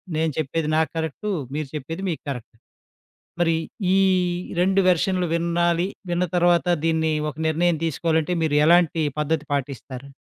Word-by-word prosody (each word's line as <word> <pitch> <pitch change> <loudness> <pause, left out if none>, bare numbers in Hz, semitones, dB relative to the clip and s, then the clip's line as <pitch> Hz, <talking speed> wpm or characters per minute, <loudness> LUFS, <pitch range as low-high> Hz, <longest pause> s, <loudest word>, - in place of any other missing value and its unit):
నేను 160 0 +1
చెప్పేది 155 +1 -1
నా 160 - +4
కరెక్టు, 160 +6 -3 0.2
మీరు 155 -1 -3
చెప్పేది 165 +6 -5
మీకు 160 - -3
కరెక్ట్ 125 -4 -6 0.9
మరి 165 -1 +3 0.4
ఈ - - +4 0.6
రెండు 195 +2 +3
వెర్షన్లు 180 +1 +2
వినాలి, 170 +1 +1 0.2
విన్న 175 +1 +1
తరువాత 175 0 +3 0.2
దీన్ని 160 -1 +1 0.2
ఒక 150 - -14
నిర్ణయం 170 +2 +2
తీసుకోవాలంటే 160 +1 0
మీరు 155 -2 +1
ఎలాంటి 165 -1 +4 0.2
పద్ధతి 150 0 0
పాటిస్తారు? 135 -1 -4
160 Hz, 135 wpm, -23 LUFS, 155-175 Hz, 0.9 s, నా